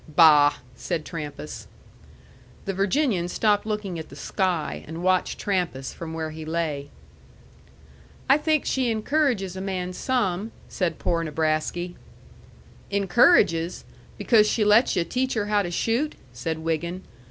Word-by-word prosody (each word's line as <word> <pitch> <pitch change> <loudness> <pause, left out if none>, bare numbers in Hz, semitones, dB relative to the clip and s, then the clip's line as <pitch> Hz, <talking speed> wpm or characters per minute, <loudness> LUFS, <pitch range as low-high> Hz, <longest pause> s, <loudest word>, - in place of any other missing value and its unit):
"Bah!" 150 -2 +6 0.2
said 150 +7 -3
Trampas. 145 - -7 1.0
The 195 - -2
Virginian 195 - +1
stopped 205 +3 +1
looking 210 -5 -3
at 160 - -8
the 140 - -11
sky, 175 0 -2
and 165 +3 -6
watched 185 0 +1
Trampas 175 -9 -2
from 165 -1 -7
where 160 -1 -3
he 160 0 -8
lay. 155 -3 -3 1.4
"I 275 +2 +5
think 310 -1 +1
she 260 -2 0
encourages 225 - 0
a 190 - -5
man 185 -2 -3
some," 210 -2 -1
said 170 -4 -2
poor 170 -1 0
Nebrasky. 160 +3 -1 1.0
"Encourages? 195 - +3 0.3
Because 215 -3 +4
she 215 - +1
lets 210 +4 +5
yu' 175 - +2
teach 255 +9 -1
her 210 -2 0
how 210 0 +2
to 175 - -3
shoot," 235 - 0 0.2
said 155 +7 -3
Wiggin. 165 +3 -3
180 Hz, 135 wpm, -25 LUFS, 160-210 Hz, 1.4 s, Bah